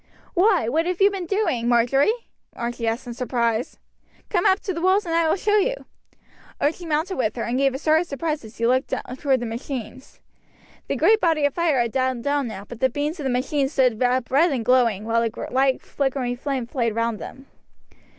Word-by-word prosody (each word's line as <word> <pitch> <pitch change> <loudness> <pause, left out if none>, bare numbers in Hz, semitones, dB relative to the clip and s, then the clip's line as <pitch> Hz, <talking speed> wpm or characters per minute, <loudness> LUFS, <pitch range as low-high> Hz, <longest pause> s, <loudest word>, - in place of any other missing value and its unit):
"Why, 370 - +3
what 320 +8 +1
have 360 -1 -2
you 400 +1 +5
been 380 -3 -5
doing, 335 - 0
Marjory?" 245 - +3 0.5
Archie 235 -1 -3
asked 230 +4 -2
in 240 - -6
surprise. 235 -2 -1 0.5
"Come 355 -4 +2
up 380 +1 +4
to 380 - -3
the 335 - -4
walls 375 +3 +3
and 335 - -3
I 330 -1 +2
will - - +3
show 415 +2 +2
you." - - +2 0.8
Archie 330 +4 -1
mounted 320 +5 -1
with 220 -4 0
her, 235 - -3
and 240 - -2
gave 275 -1 +2
a - - -1
start 310 +2 +3
of 350 - -5
surprise 305 0 -3
as 220 0 -13
he 230 - 0
looked 255 +2 +1 0.3
towards 265 -3 +1
the - - -2
machines. 240 +1 -7 0.7
The - - -1
great 440 0 +4
body 320 -4 +2
of 285 - +1
fire 335 -6 +1
had 235 -1 0
died 260 -2 -1
down 285 -1 0
now, 200 -3 -7
but 240 +2 -10
the 260 - +3
beams 295 +6 -3
of 290 - -5
the - - +1
machines 270 +3 0
stood 250 -4 +2
up 250 0 +1
red 310 +6 +4
and 245 -5 -2
glowing, 235 -5 +3
while 230 +1 +1
a 230 - +1 0.2
light 265 +1 +2
flickering 265 -3 -2
flame 265 -1 -3
played 230 -2 -2
round 230 -1 -1
them. 270 - -9
265 Hz, 215 wpm, -23 LUFS, 240-325 Hz, 0.8 s, you